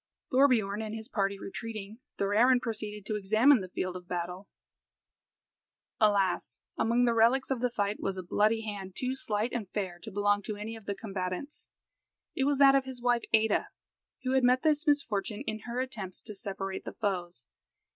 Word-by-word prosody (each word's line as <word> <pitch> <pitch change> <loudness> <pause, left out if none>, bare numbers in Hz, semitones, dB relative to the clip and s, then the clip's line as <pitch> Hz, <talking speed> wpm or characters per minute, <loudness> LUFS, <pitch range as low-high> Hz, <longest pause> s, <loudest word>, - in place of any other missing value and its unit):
Thorbiorn 235 -7 +3
and 220 0 -4
his 220 0 -7
party 200 -1 -1
retreating, 215 +1 -7 0.2
Thorarin 225 +6 +4
proceeded 215 -3 -5
to 215 - -2
examine 215 +6 +4
the 185 - -7
field 185 0 -3
of 180 -1 -8
battle. 180 +2 -4 1.5
Alas! 200 -4 +2 0.2
among 235 +2 +2
the 235 - +3
reliques 235 +4 +3
of 265 - 0
the 250 - +2
fight 205 -3 -1
was 195 -1 -2
a 185 - -4
bloody 215 +5 +2
hand 200 -4 -6
too 255 0 -1
slight 220 -3 -2
and 220 -6 -3
fair 185 -4 -3
to 175 - -8
belong 205 0 +2
to 210 +1 -4
any 215 +2 -6
of 220 -3 -13
the 200 - -1
combatants. 195 +6 -5 0.7
It 270 - +1
was 285 0 +2
that 275 0 +7
of 270 -1 +3
his 260 -2 -6
wife 240 -1 +1
Ada, 220 -1 +3 0.5
who 255 - 0
had 265 -1 +3
met 250 +1 +4
this 310 +1 +2
misfortune 215 -8 +1
in 215 0 -3
her 240 +1 -2
attempts 215 -8 -4
to 215 - -6
separate 195 -1 -5
the - - -7
foes. 175 - -3
215 Hz, 180 wpm, -30 LUFS, 195-245 Hz, 1.5 s, that